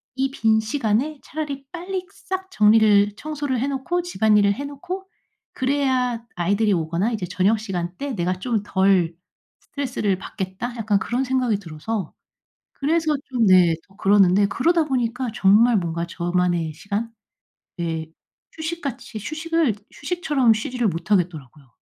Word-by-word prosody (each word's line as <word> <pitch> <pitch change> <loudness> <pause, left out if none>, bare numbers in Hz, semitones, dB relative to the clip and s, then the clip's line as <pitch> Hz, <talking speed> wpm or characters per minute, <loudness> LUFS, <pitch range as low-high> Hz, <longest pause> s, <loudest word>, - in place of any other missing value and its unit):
'이 265 0 0
빈 220 -4 +2
시간에 245 +5 -1
차라리 285 -3 -5
빨리 365 +1 -4
싹 380 -1 -6
정리를 210 -1 +5
청소를 290 -5 -3
해 270 - 0
놓고 335 +6 -1
집안일을 210 -10 +3
해 280 - -6
놓고 365 +7 -6 0.5
그래야 260 -3 0
아이들이 200 +4 +2
오거나 170 +5 0
이제 215 -6 -2
저녁 195 +4 +2
시간 180 -4 -4
때 280 -2 -4
내가 180 -2 0
좀 225 0 -1
덜 190 -4 +2 0.4
스트레스를 245 -8 -2
받겠다.' 190 +7 -5
약간 210 -3 +1
그런 245 +6 -1
생각이 250 -5 +1
들어서 180 +2 -5 0.6
그래서 310 +1 +1
좀 240 -4 +2
네 180 -3 +6
더 195 - -22
그러는데 195 0 +4
그러다 330 - +2
보니까 250 -2 -1
정말 215 +4 +5
뭔가 170 -1 -2
저만의 175 -2 0
시간 200 +7 -3 0.7
예 160 -2 -2 0.5
휴식같이 315 -8 -5
휴식을 315 -2 0 0.2
휴식처럼 290 -7 +1
쉬지를 240 0 -1
못하겠더라고요. 165 - -2
225 Hz, 310 characters per minute, -23 LUFS, 190-275 Hz, 0.7 s, 네